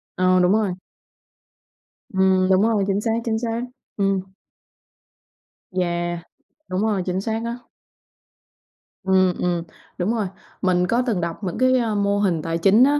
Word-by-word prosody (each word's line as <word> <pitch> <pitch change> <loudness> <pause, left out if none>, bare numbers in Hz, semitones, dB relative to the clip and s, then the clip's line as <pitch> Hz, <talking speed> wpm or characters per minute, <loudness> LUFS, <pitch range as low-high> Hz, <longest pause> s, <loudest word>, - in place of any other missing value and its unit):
Ờ, 185 0 +3
đúng 180 0 +4
rồi. 210 -4 +1 1.4
Ừm, 190 0 +3
đúng 190 0 +5
rồi, 215 -2 +2
chính 200 +1 +1
xác, 225 - 0
chính 220 -1 0
xác. 230 0 -2 0.4
Ừm. 195 -2 +1 1.5
Yeah, 175 -1 -1 0.5
đúng 185 +1 -1
rồi, 210 -4 +1
chính 185 +1 -1
xác 220 +2 -2
á. 235 +1 -3 1.5
Ừm, 185 -1 +3
ừm, 175 -1 0 0.3
đúng 195 +5 0
rồi. 220 -4 -1 0.3
Mình 180 -1 +2
có 235 +6 +2
từng 215 -8 0
đọc 170 +4 -4
những 180 -3 -3
cái, 255 0 +4
à, 230 -4 0
mô 200 0 +1
hình 180 -6 +1
tài 165 +1 -2
chính 195 +8 +5
á, 290 +2 +4
190 Hz, 150 wpm, -22 LUFS, 180-220 Hz, 1.5 s, đúng